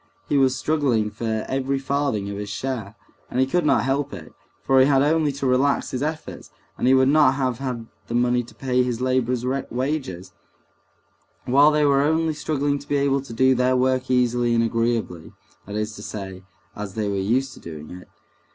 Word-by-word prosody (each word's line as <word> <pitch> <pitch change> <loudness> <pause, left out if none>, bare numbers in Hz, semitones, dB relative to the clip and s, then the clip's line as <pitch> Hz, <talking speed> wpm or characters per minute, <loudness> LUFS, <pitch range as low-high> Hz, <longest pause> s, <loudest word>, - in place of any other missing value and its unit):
He - - 0
was 135 -2 +3
struggling 130 -9 0
for 110 -1 -3
every 135 +1 -1
farthing 135 -6 -1
of 100 - -5
his 105 0 -5
share 110 -1 -4 0.3
(and 125 - -2
he 130 - +4
could 150 +4 0
not - - +3
help 135 +2 -1
it, 85 -5 -10 0.3
for 135 0 +4
he 130 - +6
had 135 -1 +4
only 155 0 +2
to 140 0 -4
relax 130 +2 +1
his 130 - -3
efforts, 155 +1 -5 0.3
and - - -1
he 130 - +6
would 130 0 +4
not 145 -2 +4
have 130 -4 -1
had 125 -4 -4 0.2
the 120 - -3
money 120 0 +2
to - - -16
pay 125 -1 0
his 125 -2 -1
laborers' 125 -1 0
wages), 130 - -3 1.1
while 140 +4 +5
they 150 -1 +2
were 140 -1 +4
only 160 +2 +1
struggling 145 -1 -1
to 140 - -14
be 145 - +2
able 140 -1 +1
to 135 - -12
do 130 +3 +3
their 125 0 +2
work 130 0 +1
easily 120 -1 +2
and 115 - +3
agreeably, 115 -7 -2 0.3
that 105 - -6
is 105 0 -3
to - - -9
say, 95 -3 -7 0.3
as 105 -2 -6
they 110 -2 -1
were 100 - -1
used 125 +7 0
to - - -13
doing 75 -2 -9
it. 90 0 -10
130 Hz, 200 wpm, -23 LUFS, 115-140 Hz, 1.1 s, he